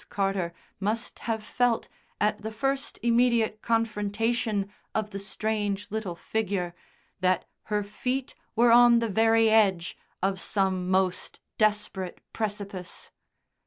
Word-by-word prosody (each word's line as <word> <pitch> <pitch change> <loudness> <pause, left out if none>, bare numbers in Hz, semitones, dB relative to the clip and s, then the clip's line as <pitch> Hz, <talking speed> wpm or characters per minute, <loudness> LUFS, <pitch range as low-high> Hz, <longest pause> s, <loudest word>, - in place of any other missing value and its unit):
Carter 195 -3 0 0.3
must 215 +4 -2
have 220 -1 -1
felt 240 +1 +1 0.3
at 210 0 +1
the 220 +1 -4
first 270 +5 -1
immediate 235 -2 +3
confrontation 220 -1 0 0.3
of 215 -1 -1
the 200 - -4
strange 205 0 -2
little 210 -5 -3
figure 195 -3 -2 0.5
that 185 -1 +2 0.2
her 210 -1 0
feet 250 +6 -3 0.2
were 235 +1 +5
on 240 0 +8
the 230 0 +1
very 225 +2 +4
edge 200 -6 +3 0.3
of 190 -1 +1
some 190 -2 0
most 185 -1 0 0.2
desperate 210 -3 0
precipice. 200 -4 -5
210 Hz, 120 wpm, -27 LUFS, 195-225 Hz, 0.5 s, on